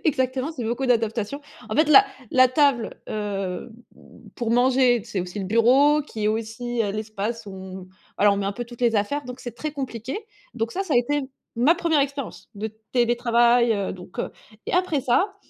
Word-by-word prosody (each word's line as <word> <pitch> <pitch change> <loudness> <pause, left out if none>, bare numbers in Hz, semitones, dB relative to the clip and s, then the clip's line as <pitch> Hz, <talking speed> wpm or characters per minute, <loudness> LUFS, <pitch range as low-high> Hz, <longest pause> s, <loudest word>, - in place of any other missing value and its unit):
exactement, 260 0 0
c'est 250 -7 -5
beaucoup 240 +4 -1
d'adaptation, 230 +2 0 0.3
en 215 - -3
fait, 310 0 +4
la 400 +7 +9 0.3
la 255 -1 +6
table, 275 -4 +1
heu, 200 0 -3 0.2
mmh, - - -18
pour 235 -3 -2
manger 245 -1 +3
c'est 200 -5 -3
aussi 180 +3 -6
le 195 - -3
bureau 265 +8 +4
qui 225 -7 -6
est 210 - +3
aussi, 225 +2 -2
heu, 200 - -1
l'espace 215 +1 -4
où 200 - -8
on 190 0 -9 0.3
alors 205 0 +5
on - - -3
met 195 - -1
un 200 - -1
peu 240 +4 -5
toutes 240 0 -13
les 235 -3 +3
affaires 285 +8 -1
donc 250 +1 -8
c'est 240 -2 -7
très 305 +3 -4
compliqué, 265 - -4 0.4
donc 225 -1 -2
ça 390 - -1
ça 320 - -1
a - - +5
été 290 +4 0 0.3
ma 275 +8 +4
1re 330 -4 +2
expérience 275 -2 -4
de 215 +2 -4 0.2
télétravail, 240 -1 +3
heu, 200 -2 -2
donc 180 0 -12
heu, - - -2 0.4
et - - -3
après 355 -5 +1
ça, 365 - +1
240 Hz, 200 wpm, -24 LUFS, 215-275 Hz, 0.4 s, la